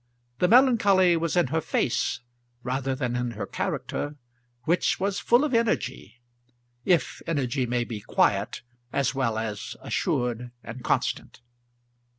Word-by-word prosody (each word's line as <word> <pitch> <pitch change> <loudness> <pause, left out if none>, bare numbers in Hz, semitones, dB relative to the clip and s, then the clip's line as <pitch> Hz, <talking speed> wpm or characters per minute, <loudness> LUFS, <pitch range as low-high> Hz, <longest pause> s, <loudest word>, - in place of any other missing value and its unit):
The 180 - +4
melancholy 205 -7 +5
was 170 +1 -1
in 175 - +5
her 160 +3 0
face - - 0 0.4
rather 130 +1 -1
than 125 -3 -2
in 125 -1 -1
her - - -3
character, 145 +1 -3 0.5
which 170 +7 +1
was 195 +1 0
full 240 +4 +4
of 300 -3 -1
energy, 230 - -1 0.6
if 170 -7 +1
energy 135 -5 0
may 120 0 0
be 115 -3 -6
quiet - - +1 0.3
as 140 -1 +1
well 125 -5 0
as 110 -2 -4
assured 120 0 -1
and 120 +1 -8
constant. - - -1
135 Hz, 135 wpm, -26 LUFS, 120-180 Hz, 0.6 s, melancholy